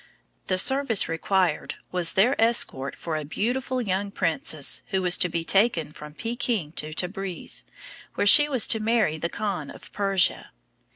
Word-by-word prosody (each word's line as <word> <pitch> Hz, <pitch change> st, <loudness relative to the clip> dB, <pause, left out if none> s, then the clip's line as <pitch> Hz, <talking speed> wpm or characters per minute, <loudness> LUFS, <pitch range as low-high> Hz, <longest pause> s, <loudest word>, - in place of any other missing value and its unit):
The 185 Hz, -, 0 dB
service 265 Hz, +1 st, +2 dB
required 175 Hz, 0 st, -1 dB, 0.2 s
was 175 Hz, -2 st, -3 dB
their 220 Hz, +8 st, +3 dB
escort 225 Hz, -, 0 dB
for 165 Hz, -2 st, -5 dB
a 155 Hz, -, -3 dB
beautiful 250 Hz, -, -2 dB
young 200 Hz, -3 st, -2 dB
princess 155 Hz, -5 st, -1 dB
who 190 Hz, -2 st, -2 dB
was 180 Hz, -1 st, +6 dB
to 180 Hz, -, +3 dB
be 170 Hz, 0 st, -3 dB
taken 175 Hz, -5 st, +1 dB
from 150 Hz, 0 st, -12 dB
Peking 230 Hz, -8 st, -3 dB
to 155 Hz, -2 st, -6 dB
Tabriz, 185 Hz, +2 st, -4 dB, 0.5 s
where -, -, 0 dB
she 295 Hz, +8 st, +9 dB
was 260 Hz, -5 st, +3 dB
to 220 Hz, -, +2 dB
marry 215 Hz, -8 st, 0 dB
the 170 Hz, -, -3 dB
Khan 200 Hz, 0 st, -4 dB
of -, -, -13 dB
Persia. 195 Hz, -3 st, 0 dB
190 Hz, 160 wpm, -24 LUFS, 165-225 Hz, 0.5 s, she